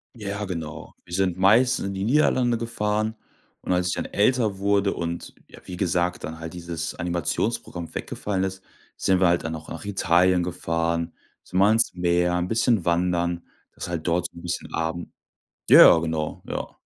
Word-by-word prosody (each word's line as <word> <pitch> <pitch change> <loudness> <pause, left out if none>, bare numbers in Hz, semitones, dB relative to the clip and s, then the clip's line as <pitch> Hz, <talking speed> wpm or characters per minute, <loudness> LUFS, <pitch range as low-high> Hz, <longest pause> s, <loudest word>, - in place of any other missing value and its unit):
Ja, 100 -1 -4
genau. 85 -5 -6
Wir 85 - -11
sind 95 -1 +1
meistens 115 +6 +4
in 100 - -3
die 95 0 -3
Niederlande 125 -2 +2
gefahren 110 -1 -1 0.5
und - - -4
als 90 0 +1
ich - - 0
dann - - -3
älter 110 -2 +1
wurde 100 0 +1
und, 85 0 -5
ja, - - -14
wie 90 -1 -7
gesagt, 90 -1 0
dann 80 +1 -6
halt 80 0 -7
dieses 85 -2 -5
Animationsprogramm 85 +1 -2
weggefallen 95 -2 -3
ist, 95 0 -4 0.3
sind 95 -1 +2
wir 95 - +5
halt 85 0 +2
dann 80 0 -3
auch 80 0 -10
nach 85 +5 -7
Italien 90 -2 +3
gefahren, 85 -1 -2 0.3
sind 95 - -2
mal 100 - +6
ans 110 0 +3
Meer, 90 0 +1
'n 90 0 -1
bisschen 115 -3 +1
wandern. 85 0 0 0.3
Das - - -10
ist - - -4
halt 85 -1 -4
dort 85 +1 +1
so - - -17
'n - - -9
bisschen 90 0 -5
aben 85 +1 -3 0.6
ja, - - +9
ja, - - +8
genau, 80 -1 -3
ja. - - -5
90 Hz, 185 wpm, -24 LUFS, 85-100 Hz, 0.6 s, ja